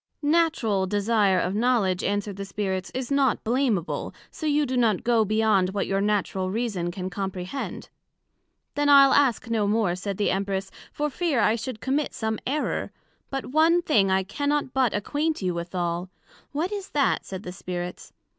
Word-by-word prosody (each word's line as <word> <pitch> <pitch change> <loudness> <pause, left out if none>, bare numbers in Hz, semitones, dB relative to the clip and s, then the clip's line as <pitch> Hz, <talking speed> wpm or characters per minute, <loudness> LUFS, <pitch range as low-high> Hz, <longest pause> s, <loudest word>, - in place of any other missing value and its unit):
Natural 290 - +2
desire 205 -1 +2
of 185 - -1
knowledg, 210 -5 +2
answered 205 0 -1
the 200 - -4
Spirits, 190 -2 -3
is 260 0 -3
not 275 -3 +2
blameable, 230 - -1 0.2
so 315 - -4
you 295 0 +2
do 260 -1 -2
not 225 -6 +2
go 235 -2 +3
beyond 215 -3 +2
what 200 - 0
your 195 0 0
Natural 200 -2 0
Reason 205 -5 -2
can 185 +1 -5
comprehend. 190 +6 -5 0.9
Then 290 0 +1
I'le 275 -1 +8
ask 250 -4 +3
no 215 -3 +1
more, 205 -4 +1
said 195 +1 -4
the 205 - +1
Empress, 195 0 -2 0.2
for 295 0 -2
fear 320 -5 0
I 215 0 +4
should 230 0 -5
commit 280 +2 -1
some 220 -1 -2
error; 295 +3 -1 0.4
but 270 -1 -3
one 330 +4 +4
thing 205 -12 +3
I 190 0 +2
cannot 285 +6 -1
but 260 -4 +2
acquaint 290 +6 -1
you 180 -1 0
withal: 175 +1 -3 0.4
What 320 +7 -2
is 405 -2 -5
that, 285 -2 +2
said 190 0 -7
the 180 - -6
Spirits? 180 0 -6
215 Hz, 170 wpm, -25 LUFS, 190-275 Hz, 0.9 s, I'le